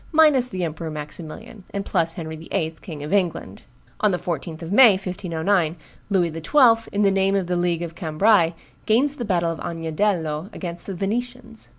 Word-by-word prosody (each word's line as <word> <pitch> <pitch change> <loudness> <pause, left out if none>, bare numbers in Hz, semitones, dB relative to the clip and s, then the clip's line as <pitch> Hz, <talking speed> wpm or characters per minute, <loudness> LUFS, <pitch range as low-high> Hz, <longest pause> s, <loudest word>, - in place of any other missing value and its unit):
minus 300 -6 +5
the 185 -6 -3
Emperor 160 0 -4
Maximilian, 155 +6 -8
and 200 0 -2
plus 165 -3 0
Henry 160 -2 -6
VIII., 160 0 -3
King 155 -5 -8
of 150 - -4
England. 175 - -1 0.4
On 210 0 +3
the 180 - 0
14th 165 -1 -5
of 165 - -6
May, 230 0 +8
1509, 180 -2 -1 0.3
Louis 175 -5 +1
XII., 225 - +3
in 205 +1 +1
the 200 - +4
name 195 0 +2
of 195 -2 +1
the 180 +1 -1
League 175 -1 0
of 165 -1 -6
Cambrai, 170 +1 +2 0.3
gains 275 +7 +2
the 240 - -3
battle 170 -4 +1
of 165 - -6
Agnadello 165 0 -2
against 170 -2 -6
the 195 - -4
Venetians. 230 +4 -4
180 Hz, 180 wpm, -23 LUFS, 165-205 Hz, 0.4 s, May